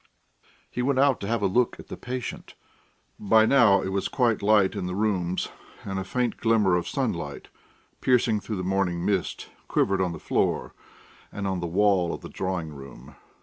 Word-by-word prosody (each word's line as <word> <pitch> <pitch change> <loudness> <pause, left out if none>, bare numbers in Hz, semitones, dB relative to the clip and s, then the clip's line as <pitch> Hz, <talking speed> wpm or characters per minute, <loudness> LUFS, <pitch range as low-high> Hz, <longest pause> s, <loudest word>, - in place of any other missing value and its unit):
He 125 - -2
went 130 +1 +1
out 135 -1 +4
to 100 - -5
have 115 -1 -1
a - - +3
look 115 +6 +1
at - - -11
the - - -5
patient. 125 -1 -6 0.6
By 110 +2 +4
now 110 -7 +5
it 95 - -2
was 95 0 -1
quite 120 -5 +1
light 105 -2 +4
in 90 - -3
the 90 - -3
rooms, 95 -4 -1 0.3
and 95 -1 -3
a - - -3
faint 120 +5 -1
glimmer 110 -5 +3
of 90 - -1
sunlight, - - -3 0.5
piercing 120 -4 +2
through 105 0 -5
the 90 - -3
morning 90 -2 0
mist, 100 -4 -1 0.2
quivered 95 -1 +1
on 90 -2 0
the 85 - -6
floor - - -1 0.6
and 100 - -5
on 95 -2 -1
the 85 - -3
wall 95 -1 +2
of - - -11
the - - -9
drawing 90 -5 -3
room. 70 -2 -12
100 Hz, 190 wpm, -26 LUFS, 90-115 Hz, 0.6 s, now